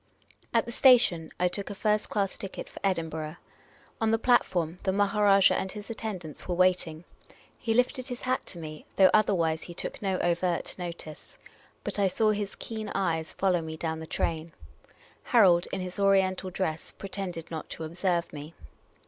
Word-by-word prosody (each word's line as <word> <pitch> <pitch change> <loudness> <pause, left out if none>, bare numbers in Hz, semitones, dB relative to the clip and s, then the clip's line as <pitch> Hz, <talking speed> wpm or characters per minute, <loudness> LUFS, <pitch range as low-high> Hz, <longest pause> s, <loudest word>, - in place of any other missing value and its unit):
At - - +2
the 235 - -6
station 235 - +5
I 180 - +3
took 195 +3 -4
a 205 - -5
first 210 +1 +1
class 200 -2 0
ticket 195 - -7
for - - -11
Edinburgh. 160 -4 -1 0.7
On 225 - +3
the 225 - +3
platform, 180 -8 +2
the 190 - +1
Maharajah 200 0 +4
and 190 - -2
his 210 +1 -7
attendants 190 -9 -5
were 180 - -1
waiting. 180 -3 +2 0.6
He 225 -2 0
lifted 250 +1 +1
his 245 -2 -6
hat 255 0 0
to 180 - -5
me, 155 -2 -8
though 190 -1 +6
otherwise 170 -7 +3
he 175 - -9
took - - -5
no 190 -2 0
overt 175 0 0
notice. 170 -3 -8 0.5
But - - -3
I 200 - +4
saw 215 +3 +2
his 205 -1 -3
keen 220 -2 -6
eyes 165 -4 -1
follow 185 -3 +1
me 160 0 -6
down 160 0 -2
the 160 - -7
train. 160 0 -2 0.7
Harold, 185 -7 +5
in 190 - -2
his 185 +1 -5
Oriental 190 -1 +3
dress, 175 -4 -3
pretended 185 -4 -5
not 160 -1 -5
to 165 - -6
observe 175 +1 -1
me. 150 +2 -8
185 Hz, 175 wpm, -28 LUFS, 165-205 Hz, 0.7 s, though